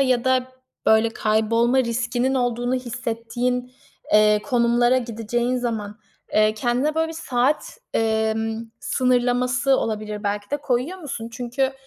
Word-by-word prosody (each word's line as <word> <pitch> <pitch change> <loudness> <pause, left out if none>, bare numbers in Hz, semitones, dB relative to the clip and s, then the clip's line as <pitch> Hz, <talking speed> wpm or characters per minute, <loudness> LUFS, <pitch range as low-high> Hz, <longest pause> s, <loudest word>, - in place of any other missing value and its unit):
ya 255 -3 +2
da 260 0 +2 0.4
böyle 220 +1 +5
kaybolma 230 +4 +2
riskinin 245 +1 0
olduğunu 245 0 0
hissettiğin, 245 0 -3 0.4
eee, 210 0 +5
konumlara 240 0 +3
gideceğin 240 +1 -2
zaman, 220 -3 -3 0.3
eee, 215 0 +3
kendine 245 +7 0
böyle 320 0 +1
bir - - -6
saat, 270 - -1 0.2
emm, 220 0 0 0.2
sınırlaması 250 +2 +2
olabilir 215 -2 -3
belki 205 0 -2
de, 290 - +1
koyuyor 285 +6 -2
musun? 255 -8 -6
Çünkü 250 +2 -1
240 Hz, 120 wpm, -23 LUFS, 225-255 Hz, 0.4 s, böyle